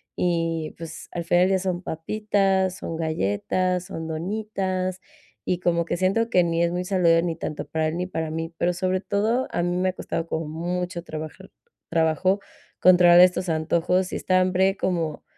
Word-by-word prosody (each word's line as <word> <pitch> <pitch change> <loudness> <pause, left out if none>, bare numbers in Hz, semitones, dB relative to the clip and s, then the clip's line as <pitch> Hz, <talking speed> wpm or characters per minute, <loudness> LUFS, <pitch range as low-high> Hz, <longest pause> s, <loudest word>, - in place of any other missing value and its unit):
y, 165 -2 -1
pues, 165 0 -8
al 170 -1 -4
final 175 +2 +4
ya 190 -1 +2
son 180 -1 -2
papitas, 190 +2 0
son 165 - -5
galletas, 165 - -1
son 160 -2 -6
donitas, 185 +1 -2 0.5
y 180 -1 0
como 170 -1 +1
que - - -2
siento 195 +6 +1
que 180 - +5
ni 170 0 +1
es 170 - +1
muy 180 +1 -2
saludable 170 -3 +3
ni 170 -2 -1
tanto 155 - -5
para 160 -1 -1
él 160 - -4
ni 180 +1 -2
para 160 -3 -3
mí. 165 +1 -4
Pero, 175 +1 +1
sobre 185 +1 0
todo, 220 +6 0
a - - -1
mí 175 0 0
me 185 +1 +1
ha 185 - -3
costado 165 -2 -4
como 160 -1 -3
mucho 175 +2 -3
trabajar 155 -2 -8 0.4
trabajo 165 +4 +2 0.4
controlar 175 -1 +7
estos 180 0 +4
antojos 170 +3 +1
y - - -1
esta 185 0 +2
hambre 185 +1 +2
como 165 -5 -2
175 Hz, 180 wpm, -24 LUFS, 165-185 Hz, 0.5 s, controlar